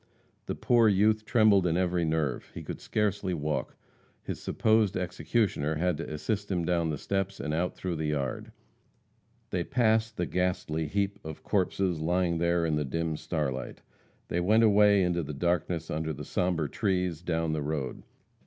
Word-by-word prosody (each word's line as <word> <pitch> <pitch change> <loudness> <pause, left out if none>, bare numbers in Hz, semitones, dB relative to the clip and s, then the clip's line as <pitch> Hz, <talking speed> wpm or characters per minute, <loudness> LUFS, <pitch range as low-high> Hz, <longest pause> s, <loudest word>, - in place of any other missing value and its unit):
The - - -2
poor 115 -2 +4
youth 105 +2 +3
trembled 105 -6 +4
in 85 0 +1
every 90 -1 +1
nerve. 80 -5 -1
He - - -6
could - - -7
scarcely 100 -3 -1
walk. 75 -1 -2 0.5
His - - -5
supposed 110 -3 +2
executioner 90 -4 0
had 85 +1 0
to 80 - -6
assist 100 +7 -2
him 90 -3 0
down 85 -2 +1
the 75 - -2
steps 95 +4 -2
and 75 +2 -3
out 90 +3 -1
through 90 -3 -3
the 80 0 -2
yard. 70 -4 -2 1.0
They 90 - 0
passed 110 -2 +1
the 90 - 0
ghastly 85 -4 -1
heap 100 +4 -1
of 80 -1 -8
corpses, 95 -3 0
lying 85 +1 +1
there 85 0 +2
in 80 -2 +1
the 75 - 0
dim 80 +3 -2
starlight. 65 -6 -3 0.4
They 85 - -1
went 110 +6 +4
away, 105 -2 +5
into 85 -1 +1
the 75 -2 -6
darkness 85 +1 -1
under 80 +1 -2
the - - -7
sombre 90 -4 0
trees, 90 -2 -1
down 80 -2 -1
the 75 - -1
road. 70 -3 -3
90 Hz, 170 wpm, -29 LUFS, 80-100 Hz, 1.0 s, away